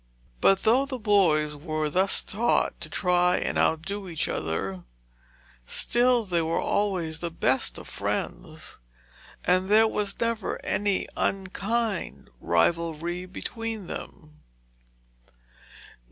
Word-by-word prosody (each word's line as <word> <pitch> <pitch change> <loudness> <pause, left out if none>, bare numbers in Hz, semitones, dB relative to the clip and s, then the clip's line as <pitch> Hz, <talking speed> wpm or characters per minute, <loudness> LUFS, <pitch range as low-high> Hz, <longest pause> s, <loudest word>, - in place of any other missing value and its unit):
But 195 0 +4
though 250 +5 +3
the 265 -2 -4
boys 175 -9 +3
were 155 +1 -2
thus 185 +6 +3
taught 225 +5 0
to - - -6
try 180 -1 +2
and - - -2
outdo 190 +5 0
each 160 -3 -2
other, 90 +3 -3 0.8
still 240 - +2
they 175 -3 +1
were 165 +1 0
always 180 -6 -1
the 170 - -3
best 130 - 0
of - - -10
friends, - - -4 0.7
and 185 +1 +2
there 220 +2 +6
was 210 -2 -2
never 230 -3 -1
any 205 -2 0
unkind 195 - -2
rivalry 170 - 0
between 225 +2 -5
them. 155 -2 -9
185 Hz, 110 wpm, -26 LUFS, 160-210 Hz, 0.8 s, there